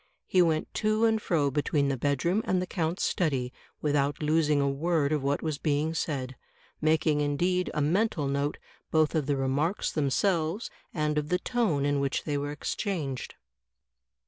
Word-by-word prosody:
He 185 Hz, -, +3 dB
went 160 Hz, -2 st, +1 dB
to 215 Hz, +1 st, +2 dB
and 220 Hz, -1 st, +2 dB
fro 150 Hz, -8 st, +1 dB
between 145 Hz, 0 st, +1 dB
the 135 Hz, -, 0 dB
bedroom 145 Hz, -, +1 dB
and 185 Hz, -, +1 dB
the 180 Hz, -, -1 dB
count's 170 Hz, -1 st, -2 dB
study, 135 Hz, -8 st, 0 dB, 0.3 s
without 145 Hz, -1 st, +1 dB
losing 150 Hz, -1 st, +2 dB
a 140 Hz, -, +2 dB
word 150 Hz, +1 st, +1 dB
of 150 Hz, -2 st, +1 dB
what 140 Hz, +1 st, 0 dB
was 155 Hz, -3 st, -2 dB
being 150 Hz, +1 st, 0 dB
said 135 Hz, -5 st, -3 dB, 0.2 s
— -, -, -21 dB
^making 155 Hz, -1 st, +3 dB
indeed 175 Hz, +6 st, +1 dB
a 150 Hz, -, +1 dB
mental 170 Hz, 0 st, +1 dB
note 140 Hz, +1 st, -1 dB, 0.3 s
both 155 Hz, -1 st, +2 dB
of 155 Hz, -4 st, 0 dB
the 145 Hz, -1 st, +1 dB
remarks 140 Hz, +8 st, 0 dB
themselves 160 Hz, -, 0 dB, 0.2 s
and 150 Hz, -1 st, 0 dB
of 150 Hz, 0 st, -5 dB
the 180 Hz, -, +3 dB
tone 185 Hz, -, 0 dB
in 145 Hz, 0 st, +1 dB
which 140 Hz, -1 st, -1 dB
they 150 Hz, -, -2 dB
were 145 Hz, 0 st, -2 dB
ex 145 Hz, 0 st, -3 dB
changed." 155 Hz, -, -3 dB
150 Hz, 175 wpm, -28 LUFS, 140-170 Hz, 0.3 s, He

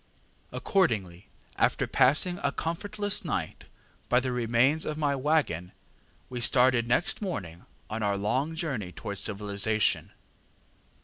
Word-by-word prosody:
ŌĆ£Accordingly, 105 Hz, -, 0 dB, 0.3 s
after -, -, +2 dB
passing 155 Hz, +7 st, +3 dB
a 140 Hz, -, +1 dB
comfortless 205 Hz, +7 st, -2 dB
night 95 Hz, -, -3 dB, 0.4 s
by 125 Hz, -, +5 dB
the 130 Hz, 0 st, -2 dB
remains 125 Hz, +5 st, +2 dB
of 150 Hz, -, -3 dB
my 145 Hz, -2 st, +1 dB
waggon, 135 Hz, -, 0 dB, 0.5 s
we 125 Hz, -1 st, -5 dB
started 125 Hz, -1 st, +3 dB
next 125 Hz, -, +1 dB
morning 95 Hz, -, -5 dB, 0.2 s
on 110 Hz, +1 st, -4 dB
our 100 Hz, -1 st, +1 dB
long 130 Hz, +10 st, -1 dB
journey 135 Hz, -, -3 dB
towards 100 Hz, +3 st, -6 dB
civilization. 105 Hz, +1 st, 0 dB
125 Hz, 120 wpm, -28 LUFS, 105-155 Hz, 0.5 s, by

